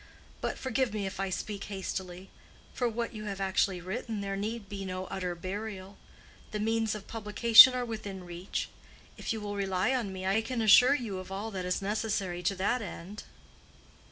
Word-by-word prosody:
"But - - -2
forgive 260 -3 -1
me 205 -2 -2
if 190 0 -5
I 195 0 -1
speak 200 +2 -4
hastily—for 190 +4 -5
what 235 +1 -3
you 215 -1 -7
have 200 -2 -4
actually 190 -1 +1
written 215 +3 -4
there 195 0 -3
need 215 +1 -4
be 195 0 -6
no 185 0 -4
utter 180 -2 -2
burial. 195 +2 -6 0.5
The 210 - -4
means 225 0 +1
of 210 - -8
publication 225 +3 +8
are 250 -1 -1
within 205 -5 -6
reach. 175 +2 -4 0.5
If - - -4
you 225 - -2
will 205 -1 -4
rely 195 +4 0
on 235 -7 -1
me, 190 0 -6
I 195 +4 +2
can 240 +2 -3
assure 245 +5 +7
you 220 -8 -4
of 185 +1 -9
all 205 +3 -4
that 185 -3 -4
is 180 +2 -1
necessary 200 -4 -1
to 185 +3 0
that 205 +6 0
end." 205 +1 -8
200 Hz, 185 wpm, -30 LUFS, 190-225 Hz, 0.5 s, publication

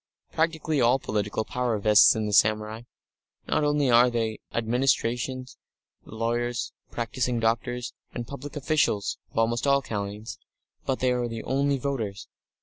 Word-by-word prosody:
Practically 160 -2 0
all 120 +2 +5
political 105 -3 -2
power 125 -2 -1
vests 105 +2 +6
in 110 -1 -1
the 105 - -2
samurai. 110 +2 +2 0.6
Not - - +1
only 145 -3 +2
are 120 +1 +6
they 115 -2 0
the 110 - -12
only - - -6
administrators, 125 +1 0 0.5
lawyers, 120 +2 -2 0.2
practising 120 +1 -2
doctors, 120 +2 -1 0.2
and 120 - -5
public 140 +2 -8
officials 145 -8 0
of - - -15
almost 115 +3 +1
all 140 0 +3
kinds, 105 0 -5 0.5
but 130 - -1
they 130 -1 +3
are 125 -1 0
the 115 -1 -6
only 140 +1 +1
voters. 120 -7 -3
120 Hz, 145 wpm, -26 LUFS, 110-135 Hz, 0.6 s, vests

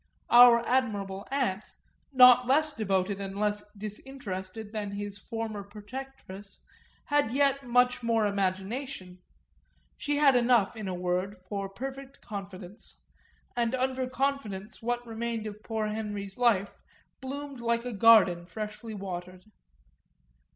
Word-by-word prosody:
Our 240 -1 +8
admirable 205 -6 -1
aunt, 250 -8 -2 0.4
not 250 -2 +7
less 305 +3 +3
devoted 195 -2 -1
and 195 0 -5
less 210 0 +1
disinterested 210 -2 -6
than 210 -2 -3
his 205 0 -5
former 225 -1 -5
protectress, 205 -1 -10 0.4
had 290 -5 +2
yet 275 0 +1
much 245 +1 +3
more 230 -2 +2
imagination; 195 +1 -3 0.8
she 290 0 -1
had 285 -3 +5
enough, 240 -3 +3
in 215 -3 -5
a 185 - -3
word, 180 +2 -1
for 195 0 -3
perfect 270 +6 -8
confidence, 195 0 -9 0.5
and 240 +1 +1
under 260 0 -1
confidence 240 -7 -3
what 240 +1 -2
remained 230 -1 -4
of 210 0 -7
poor 220 -1 -2
Henry's 205 -1 -5
life 205 -5 +2 0.4
bloomed 275 0 -6
like 235 0 0
a 245 - -4
garden 195 -5 +5
freshly 215 +3 -6
watered. 185 -2 -7
220 Hz, 125 wpm, -29 LUFS, 200-250 Hz, 0.8 s, Our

